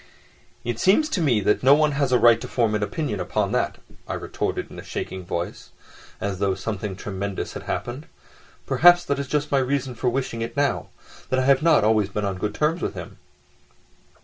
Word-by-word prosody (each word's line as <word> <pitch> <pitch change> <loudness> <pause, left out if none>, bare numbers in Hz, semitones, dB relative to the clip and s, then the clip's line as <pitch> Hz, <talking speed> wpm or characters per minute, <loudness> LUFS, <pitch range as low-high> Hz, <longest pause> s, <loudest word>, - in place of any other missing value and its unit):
"It 120 -1 -3
seems 210 +12 +4
to 190 - -1
me 125 -9 +2
that 105 +2 +2
no 135 +2 +7
one 150 0 +3
has 140 -2 0
a 125 - +5
right 120 -1 +5
to - - -5
form 115 -3 +1
an 105 - 0
opinion 105 +1 -2
upon 90 - -1
that," - - 0 0.3
I - - -3
retorted - - -3
in - - -9
a - - -8
shaking 95 -1 -5
voice, 85 0 -5 0.5
as 100 -2 -3
though 100 -1 +1
something 105 -2 -4
tremendous 100 0 -4
had - - -6
happened. 125 +6 -4 0.6
"Perhaps 175 +1 +6
that 140 0 -1
is 140 - -3
just 150 +1 -1
my 140 - +4
reason 130 0 -1
for 125 +2 0
wishing 120 -2 -3
it 115 +5 -5
now, 145 0 0 0.4
that 130 - +1
I 130 - +1
have 135 +1 +4
not 160 -7 +4
always 105 -2 +3
been 105 +1 -2
on 95 -2 -3
good 105 +2 -2
terms 160 +3 0
with - - -3
him." - - -9
120 Hz, 205 wpm, -24 LUFS, 105-140 Hz, 0.6 s, no